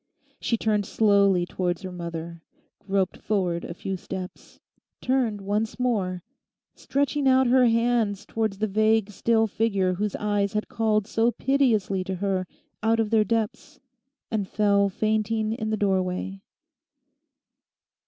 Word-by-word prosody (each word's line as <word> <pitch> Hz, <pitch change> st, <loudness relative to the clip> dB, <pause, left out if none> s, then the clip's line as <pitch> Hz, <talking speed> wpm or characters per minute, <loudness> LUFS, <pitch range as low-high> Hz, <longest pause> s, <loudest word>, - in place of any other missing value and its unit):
She 230 Hz, -, 0 dB
turned 210 Hz, -3 st, 0 dB
slowly 200 Hz, -4 st, +3 dB
towards 180 Hz, 0 st, -2 dB
her 185 Hz, -, -5 dB
mother, 170 Hz, -1 st, -6 dB, 0.4 s
groped 195 Hz, -2 st, -1 dB
forward 180 Hz, -5 st, -1 dB
a 170 Hz, -, -6 dB
few 195 Hz, +2 st, -4 dB
steps, 185 Hz, 0 st, -8 dB, 0.4 s
turned 250 Hz, -5 st, 0 dB
once 210 Hz, +4 st, -2 dB
more, 195 Hz, -8 st, -1 dB, 0.5 s
stretching 285 Hz, 0 st, -1 dB
out 260 Hz, 0 st, +5 dB
her 250 Hz, 0 st, +5 dB
hands 230 Hz, -3 st, +1 dB
towards 220 Hz, -3 st, -2 dB
the 215 Hz, -, 0 dB
vague 215 Hz, 0 st, +2 dB
still 225 Hz, +3 st, +2 dB
figure 200 Hz, -4 st, 0 dB
whose 205 Hz, +2 st, -2 dB
eyes 205 Hz, -1 st, 0 dB
had 210 Hz, 0 st, -1 dB
called 215 Hz, -2 st, +1 dB
so 225 Hz, +2 st, +1 dB
piteously 225 Hz, -7 st, +1 dB
to 190 Hz, -, -3 dB
her 185 Hz, -1 st, -1 dB, 0.3 s
out 225 Hz, +1 st, +2 dB
of 220 Hz, -1 st, 0 dB
their 220 Hz, -1 st, +4 dB
depths, 230 Hz, +7 st, -3 dB, 0.5 s
and 210 Hz, -4 st, -1 dB
fell 200 Hz, -1 st, +2 dB
fainting 215 Hz, +2 st, 0 dB
in 220 Hz, -2 st, -3 dB
the 215 Hz, -, 0 dB
doorway. 190 Hz, -1 st, -1 dB
210 Hz, 135 wpm, -25 LUFS, 190-225 Hz, 0.5 s, out